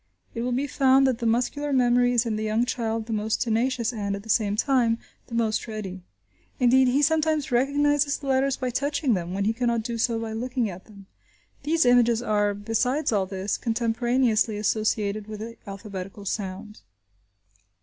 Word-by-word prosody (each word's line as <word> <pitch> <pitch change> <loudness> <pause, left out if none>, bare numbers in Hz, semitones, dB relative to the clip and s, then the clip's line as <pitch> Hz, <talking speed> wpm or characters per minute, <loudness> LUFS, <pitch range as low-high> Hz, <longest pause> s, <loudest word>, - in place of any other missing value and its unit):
It 230 - -4
will 250 +1 -1
be 260 +3 0
found 270 -1 +4
that 255 -3 +1
the 235 - -1
muscular 250 +5 0
memory 245 -1 +3
is 240 -1 +2
in 225 -2 -1
the 215 - -3
young 220 +2 +1
child 225 -2 -2
the 225 - -4
most 215 0 -1
tenacious 240 +1 0
and, 200 -3 -2
at 200 - -8
the 225 - -14
same 205 -1 +2
time, 235 -1 +2 0.3
the 235 - -7
most 225 -1 0
ready. 200 -4 -6 0.6
Indeed, 260 +1 +5
he 270 +4 +2
sometimes 310 -2 +1
recognises 285 +3 +2
the 285 - -11
letters 270 0 +1
by 255 -1 -2
touching 280 0 0
them, 180 -1 -3
when 200 0 -1
he 220 - +2
cannot 235 -1 0
do 235 0 -4
so 230 0 +1
by 225 -1 -4
looking 240 -1 -2
at 180 +1 -11
them. 200 -3 -15 0.6
These 320 0 +1
images 240 -1 +4
are, 205 -2 +1
besides 235 +8 0
all 200 -3 +1
this, 190 +1 -3
contemporaneously 230 -1 +1
associated 215 0 -1
with 215 -1 -7
the 230 +1 -7
alphabetical 195 0 -7
sound. 200 +1 -5
230 Hz, 180 wpm, -25 LUFS, 215-255 Hz, 0.6 s, Indeed